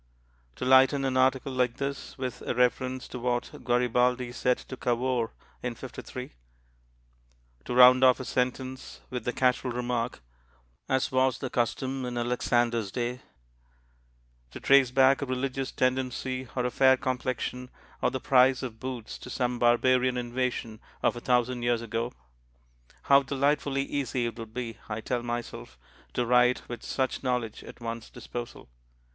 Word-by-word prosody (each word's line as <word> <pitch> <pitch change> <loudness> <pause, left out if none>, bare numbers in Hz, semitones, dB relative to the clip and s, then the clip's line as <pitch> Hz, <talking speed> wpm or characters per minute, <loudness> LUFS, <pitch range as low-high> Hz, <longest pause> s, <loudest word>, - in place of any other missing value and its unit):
To - - -4
lighten 130 +1 +5
an 130 -1 0
article 130 +1 +2
like 125 -2 0
this 140 +1 -5
with 130 -2 -4
a - - -3
reference 130 +1 +1
to 125 - -6
what 120 0 -1
Garibaldi 125 0 +1
said 125 +1 +1
to 130 - -9
Cavour 120 -1 0 0.3
in 120 -1 -3
'53; - - -8 1.3
to - - -3
round 125 +1 +8
off 130 -1 +6
a 130 - -5
sentence 130 +1 -3
with 125 -1 -4
the 125 - 0
casual 125 0 +1
remark, 120 - -2 0.7
"As 130 -1 +1
was 130 0 +2
the 130 - -5
custom 130 +2 -1
in 125 -1 -4
Alexander's 120 -3 0
day"; 120 +2 -2 1.3
to - - -9
trace 135 -2 +5
back 135 +2 +4
a 140 - -2
religious 130 +1 -2
tendency, 130 0 -1
or 125 -1 0
a 125 - 0
fair 130 0 +5
complexion, 125 -1 -3 0.3
or - - +3
the 130 - -3
price 130 -1 +4
of 115 -3 -6
boots 125 -3 -6
to - - -10
some 125 -1 -1
barbarian 125 +1 +3
invasion 120 -2 -2 0.2
of - - +2
a - - -5
thousand 125 0 +1
years 120 -1 +1
ago 115 +1 -2 0.9
how 140 0 +6
delightfully 140 0 0
easy 135 -3 -2
it 115 0 -5
would 115 -1 -7
be, 115 -2 -5
I 105 +1 -3
tell 120 +2 -2
myself, 120 - -5 0.4
to 125 - +1
write 125 +1 +3
with 120 - -6
such 130 -2 -2
knowledge 125 -4 -2
at - - -12
one's 115 -1 -6
disposal. 120 0 -8
125 Hz, 150 wpm, -28 LUFS, 120-130 Hz, 1.3 s, round